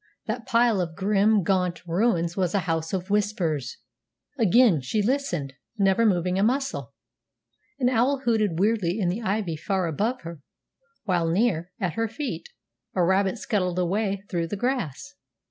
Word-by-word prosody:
That 230 +1 -4
pile 230 -4 +3
of 165 -2 -4
grim, 205 +2 +2
gaunt 180 -1 0
ruins 170 -1 +1
was 185 -1 0
a 200 - +2
House 165 -1 -1
of 190 +1 -3
Whispers! 180 -10 -1 0.6
Again 225 - +4
she 130 +12 -2
listened, 205 - -1 0.2
never 200 +3 +3
moving 180 -1 +1
a - - +3
muscle. 215 - -1 0.8
An 255 -3 +1
owl 255 +3 +2
hooted 215 -8 +1
weirdly 200 -2 +1
in 180 -4 +1
the 195 +7 -2
ivy 195 -5 -1
far 190 +3 -1
above 215 - -1
her, 170 -2 -8 0.6
while 175 -5 +1
near, 180 -2 +1
at 180 -4 -1
her 225 0 -1
feet, 285 - -5 0.5
a 180 - +3
rabbit 190 +4 +2
scuttled 185 -4 -1
away 195 +2 0
through 170 -4 -2
the 205 - -4
grass. 250 - -2
195 Hz, 155 wpm, -25 LUFS, 175-225 Hz, 0.8 s, Again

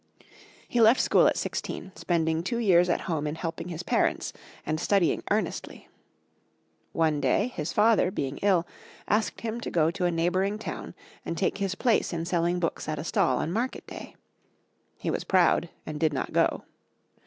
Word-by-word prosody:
He 240 - +1
left 225 +3 +6
school - - +4
at - - +1
sixteen, 190 - -4
spending 160 -2 0
two 235 +7 -2
years 180 -6 +4
at 175 - +1
home 155 -4 -2
in 150 - -3
helping 165 +1 -5
his 175 0 -5
parents, - - 0 0.3
and 155 0 -1
studying 190 0 +2
earnestly. - - -2 1.0
One 155 -3 +1
day, 220 - +2
his 160 -9 -4
father, 210 -3 +4
being 140 -6 -3
ill, 185 -4 +3 0.4
asked 215 +1 0
him 230 +1 -4
to - - -4
go 160 -1 +2
to 180 - -2
a - - +3
neighboring 185 +5 0
town 220 - -7 0.3
and 170 - -4
take 195 +1 0
his 195 -1 -1
place 230 -5 +1
in 165 0 -2
selling 175 0 0
books 165 -2 -2
at 155 - -2
a 145 - -4
stall 130 -5 +1
on 165 - -2
market 240 +5 -2
day. - - -10 0.8
He - - -2
was - - -2
proud, 175 -2 +3 0.2
and 150 -1 -5
did 155 -2 +2
not 130 - -3
go. - - +2
175 Hz, 175 wpm, -27 LUFS, 160-200 Hz, 1.0 s, left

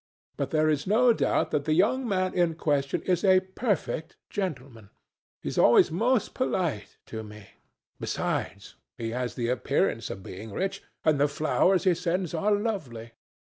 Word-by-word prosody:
But - - -2
there 155 0 +2
is 150 0 0
no 235 +4 +5
doubt - - 0
that 145 -1 0
the 155 - +2
young 240 +8 +2
man 185 -3 0
in 175 -3 +1
question 145 -3 0
is 180 -2 0
a 185 -2 +5
perfect 190 -4 -3
gentleman. 130 - -5 0.5
He - - -2
is - - -2
always 120 +7 +6
most 230 +7 +1
polite 170 - -2
to 110 - -6
me. 105 -1 -12 0.5
Besides, - - -3 0.2
he 115 -1 -4
has 125 0 -3
the 120 -1 -2
appearance 125 -4 0
of 95 - -7
being 105 +4 -8
rich, 195 - -2 0.2
and 155 -3 +3
the 145 - +4
flowers 155 +5 +2
he 185 -2 +4
sends 180 0 -2
are 185 +6 +1
lovely." 180 - -2
165 Hz, 165 wpm, -27 LUFS, 125-190 Hz, 0.5 s, always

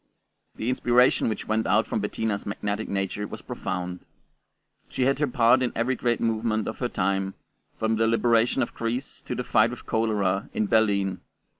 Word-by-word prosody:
The 110 - -4
inspiration 125 -1 +3
which 110 - -4
went 110 +1 0
out - - +3
from - - -2
Bettina's 110 -2 -2
magnetic 100 +1 -3
nature 100 +1 -2
was - - -9
profound. 90 -1 -4 0.9
She 130 - -1
had 135 +2 +2
her 150 - +2
part 120 +1 +4
in 125 - 0
every 120 +3 +1
great 120 -1 0
movement 110 -1 0
of 110 - -5
her 125 - -1
time, 95 -1 -1 0.4
from 110 0 0
the 115 0 +3
liberation 115 +2 +3
of - - -5
Greece 120 +4 -3
to - - -5
the - - -2
fight - - +3
with - - -9
cholera 105 -3 0
in 110 - +1
Berlin. 100 -3 +2
110 Hz, 175 wpm, -26 LUFS, 100-120 Hz, 0.9 s, part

